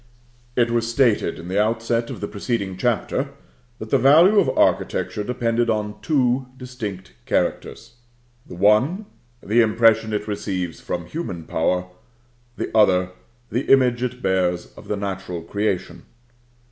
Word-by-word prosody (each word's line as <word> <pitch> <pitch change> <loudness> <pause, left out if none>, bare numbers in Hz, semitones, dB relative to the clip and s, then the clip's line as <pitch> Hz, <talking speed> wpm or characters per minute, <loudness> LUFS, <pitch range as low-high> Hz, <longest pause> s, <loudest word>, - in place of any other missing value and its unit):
It 120 -1 +2
was 115 -1 0
stated, 120 -2 +2
in 85 - -9
the 95 +3 +1
outset 115 +2 0
of - - -7
the 105 - -2
preceding 100 -2 -3
chapter, 125 +6 -1 0.4
that 110 - -9
the 135 - +4
value 165 - +6
of 195 - +2
architecture 105 - +1
depended 120 0 0
on 105 -1 -2
two 130 -4 +1
distinct 105 - -7
characters: 115 +1 -2 0.5
the - - -9
one, 110 - +3 0.4
the 115 +4 +3
impression 115 0 +3
it 105 0 -2
receives 95 -6 -3
from 85 -2 -4
human 90 - -5
power; 90 +3 0 0.7
the - - -4
other, 90 -4 +4 0.4
the 125 +4 -1
image 125 -3 +4
it 125 0 -4
bears 90 -2 0
of - - -13
the 105 - -2
natural 95 -4 -5
creation. 100 +1 -2
110 Hz, 140 wpm, -22 LUFS, 95-125 Hz, 0.7 s, value